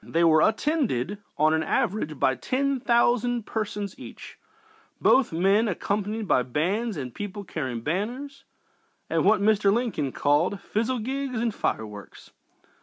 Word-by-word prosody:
They 165 +1 0
were 160 -2 +5
attended, 215 - 0 0.2
on 155 +1 +4
an 160 - +2
average, 155 -2 -1
by 130 - +3
ten 265 - -1
thousand 240 -1 +2
persons 205 -2 -3
each, - - -11 0.6
both 265 -2 +4
men 195 +7 +3
being - - -1
accompanied 210 +2 -2
by 130 - +3
bands 180 - -1
and 130 -4 -5
people 205 0 -6
carrying 130 -10 -4
banners 240 - -4 0.7
and - - +2
what 210 0 +4
Mr. 205 -1 +3
Lincoln 210 - -1
called 145 +9 +1
"fizzlegigs 255 +3 -1
and 230 -1 0
fireworks." 105 - -5
205 Hz, 135 wpm, -26 LUFS, 155-235 Hz, 0.7 s, were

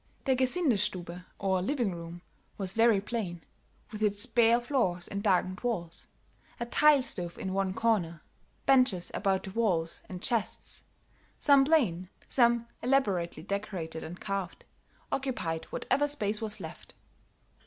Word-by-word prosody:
The 265 - +3
Gesindestube, 215 - 0
or 190 -2 0
living 235 -2 0
room, 170 +1 -9 0.3
was 190 -2 +2
very 225 -1 +4
plain, 195 -5 -4 0.5
with 215 -1 -7
its 205 -1 +3
bare 235 0 +4
floors 235 -9 -1
and 200 -1 -4
darkened 185 -2 +1
walls; 180 -9 -4 0.5
a 235 - -2
tile 290 +3 +4
stove 175 -7 -4
in 190 - -4
one 195 -1 -1
corner, 175 -9 0 0.4
benches 250 -10 +3
about 195 -2 0
the 190 - -7
walls 185 -7 0
and 185 -2 -6
chests, 225 +2 -2 0.6
some 280 -2 +5
plain, 200 - +2 0.2
some 235 -2 +3 0.2
elaborately 200 - 0
decorated 190 -5 -4
and 175 +3 -8
carved, 195 -3 -4 0.5
occupied 240 -12 -2
whatever 285 +3 0
space 215 -8 +1
was 215 -1 -4
left. 160 -4 -10
200 Hz, 130 wpm, -30 LUFS, 180-240 Hz, 0.6 s, some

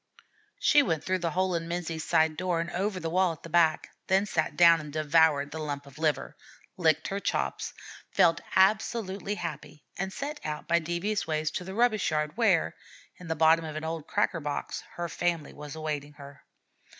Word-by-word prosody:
She 295 - +5
went 165 - -1
through 185 0 0
the 170 -1 -1
hole 185 +2 0
in 165 -1 -2
Menzie's 170 -2 -3
side 160 0 +2
door 175 0 -1
and 170 +1 -3
over 190 +2 -1
the 165 - -4
wall 185 -1 +2
at 155 - -15
the 165 - -9
back, 165 -2 +3 0.2
then 190 +1 +3
sat 160 -6 -1
down 170 -1 +7
and 150 -1 -9
devoured 155 -1 +3
the 160 - -5
lump 145 -2 -4
of 140 +1 -14
liver, 155 -2 0 0.4
licked 160 -3 +2
her 195 - -2
chops, - - -2 0.4
felt 165 - +3
absolutely 200 0 +2
happy, 155 -4 -7 0.2
and 190 +1 -2
set 295 +7 -5
out 150 -1 -5
by 170 0 +3
devious 175 +6 -2
ways 155 -1 -1
to 180 - -4
the 190 +2 -7
rubbish 230 -3 +2
yard, 150 0 -1
where, 205 -8 +2 0.4
in 180 - -11
the 160 - -1
bottom 160 +1 +4
of 155 -1 -6
an 155 - -4
old 160 -1 -4
cracker 205 -4 0
box, 145 -1 -4
her 175 0 -3
family 170 -3 -2
was 150 0 -8
awaiting 150 -2 -4
her. 140 -1 -13
165 Hz, 195 wpm, -28 LUFS, 155-185 Hz, 0.4 s, down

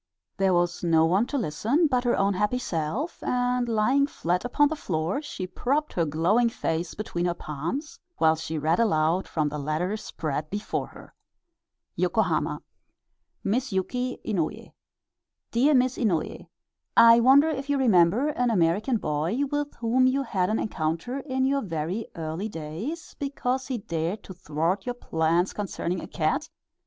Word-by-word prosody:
There 195 -1 +3
was 175 0 0
no 165 -2 +4
one 190 +8 +2
to 285 - -2
listen 235 - +1
but 255 -4 +1
her 240 - +2
own 200 +1 +2
happy 210 +6 0
self, 210 - -3
and 245 -1 0
lying 255 +6 +3
flat 180 - -1
upon 285 +4 +3
the 315 - -2
floor 175 - -2
she 245 -11 -5
propped 275 +11 -1
her 170 - +1
glowing 175 +11 +2
face 165 -5 -3
between 175 -5 -3
her 175 - -1
palms, 170 - -5 0.2
while 160 0 +4
she 160 0 -4
read 160 +5 +1
aloud 170 -4 +2
from 155 -2 0
the 150 +1 -5
letter 155 +7 -1
spread 155 -7 -4
before 205 +2 -3
her: - - -14 0.9
YOKOHAMA. - - 0 0.8
Miss 240 +6 0
YUKI 250 +7 -2
INOUYE 180 -8 -2 0.8
Dear 275 +6 +4
Miss 255 0 +2
Inouye: 185 -10 -1 0.5
I 230 0 +9
wonder 275 +6 +6
if 275 -2 -4
you 285 - +2
remember 225 - +4
an 250 -4 0
American 205 +5 +2
boy 165 - -1
with 290 0 -2
whom 245 +3 +2
you 270 +2 +1
had 190 -7 0
an 220 - +1
encounter 165 - -2
in 260 -1 -1
your 275 +1 +1
very 175 - -3
early 165 +6 -4
days, 180 - -6
because 265 -2 -2
he 260 -2 -2
dared 175 -2 -3
to 190 - -9
thwart 170 +4 -2
your 245 - -2
plans 165 -3 0
concerning 185 -3 -3
a - - -7
cat? - - -1
205 Hz, 160 wpm, -26 LUFS, 165-255 Hz, 0.9 s, I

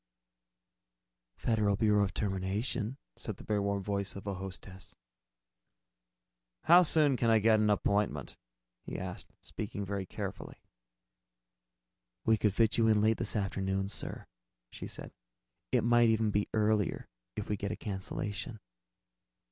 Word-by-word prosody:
"Federal 110 -3 +1
Bureau 105 -1 +3
of 100 - -1
Termination," 105 +5 -2 0.2
said 110 -4 -6
the - - -11
very 105 -1 0
warm 100 -1 -1
voice 100 0 -2
of 100 - -8
a 100 - -2
hostess. 95 0 -8 1.7
"How 175 +2 +8
soon 155 -5 +4
could 115 - +2
I 115 - +6
get 110 0 +4
an 105 0 +3
appointment?" 100 -8 0 0.5
he - - -6
asked, - - -6
speaking 100 -1 -5
very 100 -1 -3
carefully. - - -7 1.6
"We 110 - +5
could 105 -2 +1
probably 115 - +4
fit 110 - -2
you 115 - +4
in 110 -1 +4
late 110 +1 +3
this 115 -1 -2
afternoon, 95 -1 -1
sir," - - -4 0.5
she - - -7
said. - - -7 0.6
"It - - +3
might 120 0 +5
even 110 -1 +2
be 105 0 0
earlier, 105 -3 +1 0.3
if 105 - -4
we 105 - 0
get 100 0 -3
a - - -2
cancellation." 105 +2 -4
105 Hz, 140 wpm, -32 LUFS, 100-110 Hz, 1.7 s, How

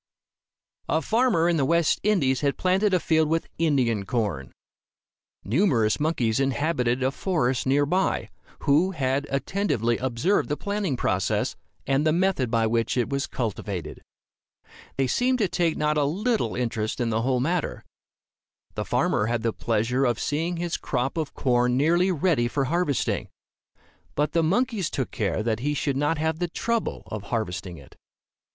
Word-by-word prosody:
A 160 - +2
farmer 225 -7 +2
in 170 -1 +2
the 140 - +2
West 170 +3 +2
Indies 145 -12 +2
had 140 -2 0
planted 190 +3 +2
a 185 - +3
field 160 -2 +2
with 165 +1 0
Indian 130 -10 +2
corn. 95 - -2 0.9
Numerous 115 - +2
monkeys 130 -8 +1
inhabited 135 -2 0
a 130 - +2
forest 135 -7 0
near 145 +2 +3
by, 185 +6 0 0.3
who 160 +6 +3
had 140 -2 -1
attentively 135 - 0
observed 130 - 0
the 150 - -1
planting 200 -9 -2
process, 95 -5 0 0.3
and 135 +2 +1
the 155 - +3
method 175 -7 +1
by 115 -1 +2
which 115 +2 0
it 120 - +1
was 140 0 -1
cultivated. 100 - -4 1.0
They 135 - +2
seemed 250 - +1
to 210 -5 +1
take 170 -2 0
not 150 0 +1
a - - +3
little 195 - 0
interest 115 -3 -2
in 120 -2 0
the 110 +1 +1
whole 130 +1 +1
matter. 165 +5 -2 0.9
The - - -3
farmer 105 - +1
had 115 -1 -1
the 115 -1 0
pleasure 115 +4 0
of 120 -3 0
seeing 165 +4 -1
his 170 0 -2
crop 130 0 -2
of 160 -3 -3
corn 125 -1 +2
nearly 170 +6 +3
ready 155 -7 +1
for 140 +3 -1
harvesting. 165 -1 0 0.9
But 150 +1 +1
the 165 - +2
monkeys 200 +2 +1
took 130 - -3
care 105 0 -1
that 110 -1 0
he 145 +4 -1
should 140 -1 -1
not 145 +3 +1
have 160 +1 -1
the 175 - 0
trouble 230 +5 -2
of 105 -2 -6
harvesting 90 -6 -3
it. 70 -3 -15
140 Hz, 160 wpm, -25 LUFS, 120-170 Hz, 1.0 s, a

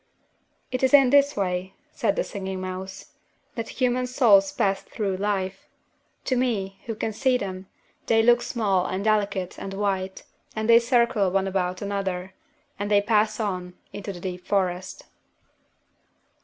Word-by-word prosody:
"It 255 - -2
is 265 +2 +5
in 270 -3 +6
this 285 -2 +4
way," 185 -1 -2 0.2
said - - 0
the - - 0
Singing 190 - -5
Mouse, 185 +8 -7 0.4
"that 230 -4 -5
human 250 -1 0
souls 205 -7 +5
pass 195 0 0
through 195 -4 -3
life. 195 -1 -2 0.6
To 260 - +1
me, 205 -6 -1
who 225 - -3
can 220 +1 -3
see 260 +2 +2
them, 190 -4 -6 0.4
they 225 -1 +4
look 240 +1 +5
small 195 -6 0
and 190 +1 -3
delicate 205 -4 0
and 195 0 -6
white; 195 -2 -2 0.3
and 220 0 -2
they 230 0 +8
circle 235 -5 +2
one 195 +1 +1
about 185 0 -2
another; 190 -2 -3 0.5
and 205 0 -2
they 205 -1 +5
pass 215 +1 +1
on, 180 -4 -3 0.2
into 205 0 -5
the 180 - -9
deep 180 0 -5
forest." 185 -2 -1
200 Hz, 155 wpm, -25 LUFS, 190-230 Hz, 0.6 s, they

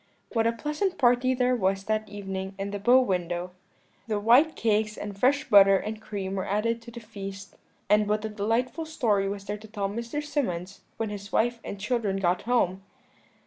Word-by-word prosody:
"What 225 -1 +2
a - - +3
pleasant 300 - -2
party 250 0 +3
there 250 0 +2
was 195 -3 0
that 215 0 -1
evening 195 -1 -5
in 200 0 -4
the 205 - -4
bow 245 +6 +6
window! 180 -4 -2 0.6
the 215 -2 0
white 250 +9 +5
cakes 215 -1 0
and 205 -1 -6
fresh 275 +8 +2
butter 195 -3 +7
and 215 +3 -5
cream 200 -3 -4
were 195 - -3
added 230 +3 0
to 235 - -11
the 235 0 -9
feast; 200 -3 -8 0.3
and 210 +1 +3
what 210 +1 0
a - - -2
delightful 230 +9 -1
story 210 -10 +1
was 200 0 -5
there 205 +1 -4
to 220 - -12
tell 205 -2 -2
to - - -6
Mr. 235 +6 -4
Symonds 195 - -3 0.2
when 225 -1 -2
his 200 0 -7
wife 240 +1 +1
and 200 - -6
children 210 -2 -1
got 180 -1 +1
home! 195 -6 +2
210 Hz, 195 wpm, -27 LUFS, 195-235 Hz, 0.6 s, butter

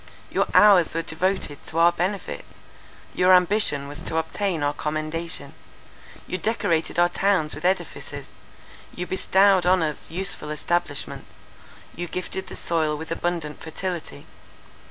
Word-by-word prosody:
Your - - +1
hours 195 -6 +6
were 165 - 0
devoted 160 -3 -1
to 160 - -6
our 170 +1 +6
benefit, 185 +3 -3 0.7
your 185 +1 +6
ambition 180 -6 +3
was 145 +2 -8
to 160 - -3
obtain 160 0 -1
our 145 0 +1
commendation. 155 +3 -3 0.7
You 185 - -4
decorated 170 -7 0
our 175 0 +5
towns 180 -4 +1
with - - -7
edifices, 185 +1 -2 0.7
you 180 - -3
bestowed 190 0 +3
on 185 -2 +4
us 150 -2 -4
useful 180 -3 -3
establishments, 150 -1 -3 0.6
you 175 +1 -4
gifted 185 +2 -4
the - - -8
soil 155 -3 0
with 160 +2 -8
abundant 165 -3 -3
fertility. 160 - -5
175 Hz, 135 wpm, -24 LUFS, 155-185 Hz, 0.7 s, hours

